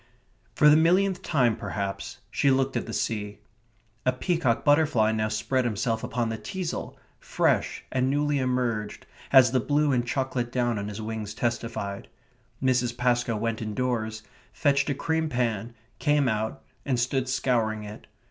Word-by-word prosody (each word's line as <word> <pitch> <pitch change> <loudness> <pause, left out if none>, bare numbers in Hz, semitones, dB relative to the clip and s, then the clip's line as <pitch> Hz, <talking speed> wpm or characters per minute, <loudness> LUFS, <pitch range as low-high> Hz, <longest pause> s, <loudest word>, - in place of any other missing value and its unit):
For 150 - +5
the 150 - +8
millionth 180 +4 +3
time, 125 - +2
perhaps, 100 -1 -4
she 140 - +2
looked 135 0 +2
at - - -2
the - - -5
sea. 105 -2 -2 0.7
A 125 - +3
peacock 130 -2 0
butterfly 145 -7 +4
now 110 -1 0
spread 115 +4 0
himself 115 0 -1
upon 120 -1 -1
the 110 -1 -4
teasle, 185 - -5 0.2
fresh - - 0
and 130 0 +1
newly 145 0 +1
emerged, 125 -4 -1 0.3
as 130 -4 +7
the 130 - +2
blue 145 +4 +1
and 125 -2 +2
chocolate 125 -1 -2
down 120 -3 0
on 100 - -4
his 105 +1 -6
wings 110 -1 -5
testified. 115 -4 -3 0.6
Mrs. 125 -2 +1
Pascoe 120 -2 +1
went 115 +1 -2
indoors, 110 0 -2 0.3
fetched 140 -1 +1
a 140 - 0
cream 160 +2 -1
pan, 115 -3 -2 0.2
came 145 -3 +2
out, 110 -1 -2 0.2
and 130 -3 0
stood 130 +1 0
scouring 115 -5 0
it. 105 0 -10
125 Hz, 155 wpm, -26 LUFS, 110-135 Hz, 0.7 s, the